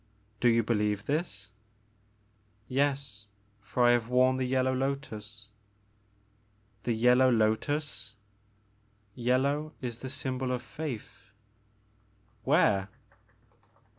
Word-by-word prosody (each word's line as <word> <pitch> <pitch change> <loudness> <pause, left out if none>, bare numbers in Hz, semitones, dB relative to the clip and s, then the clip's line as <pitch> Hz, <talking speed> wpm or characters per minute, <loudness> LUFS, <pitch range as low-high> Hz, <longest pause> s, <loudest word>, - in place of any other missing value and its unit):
Do 120 - +4
you 115 0 +3
believe 105 -2 0
this? 145 - -2 0.6
" 105 0 -38 0.5
Yes, 135 -6 -1 0.3
for 125 +4 0
I 120 - +7
have 120 -1 +1
worn 130 +1 +4
the 130 -1 -1
yellow 130 0 +1
lotus 110 -6 -4 0.4
" 105 0 -38
'* 105 0 -38
The 120 - +1
yellow 125 +3 +5
lotus 115 +1 0 0.4
" 105 0 -38
*' 105 -1 -39
Yellow 140 +5 0
is 120 -2 -5
the 130 - -6
symbol 130 -1 -2
of 125 -1 -2
faith 125 -7 -7 0.5
*' 105 +1 -37
''Where?" 95 -1 +4
115 Hz, 120 wpm, -29 LUFS, 105-130 Hz, 0.6 s, I